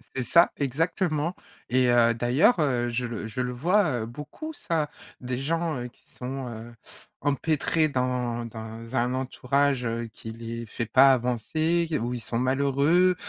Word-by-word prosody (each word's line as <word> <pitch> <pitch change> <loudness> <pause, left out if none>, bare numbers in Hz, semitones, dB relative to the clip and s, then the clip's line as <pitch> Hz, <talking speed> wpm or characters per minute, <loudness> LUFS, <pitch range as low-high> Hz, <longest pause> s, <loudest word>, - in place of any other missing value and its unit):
C'est 130 - -1
ça, 170 +8 +5
exactement 160 +3 0 0.3
et 125 0 +3
heu, 120 -1 +5
d'ailleurs, 130 - +3
heu, 125 -5 +1
je 125 +1 -2
le 115 -2 -5
je 110 - -7
le 125 - -2
vois, 160 - +2
heu, 110 - -3
beaucoup 150 - -8
ça. 165 - -1 0.3
Des 125 0 -3
gens, 165 +2 -1
heu, 120 - -4
qui - - -31
sont, 130 +1 -4
heu, 115 +1 -9 0.5
empêtrés 155 +2 +1
dans 125 -3 -1
dans 115 +1 -8
un 125 +1 +1
entourage, 130 0 0
heu, 115 0 -2
qui 110 +2 -9
les 115 +1 -6
fait 115 +1 -4
pas 135 +4 +7
avancer, 155 +8 0
où 120 +1 -2
ils 125 - -3
sont 115 +1 -2
malheureux, 140 +8 +3
130 Hz, 165 wpm, -26 LUFS, 120-150 Hz, 0.5 s, pas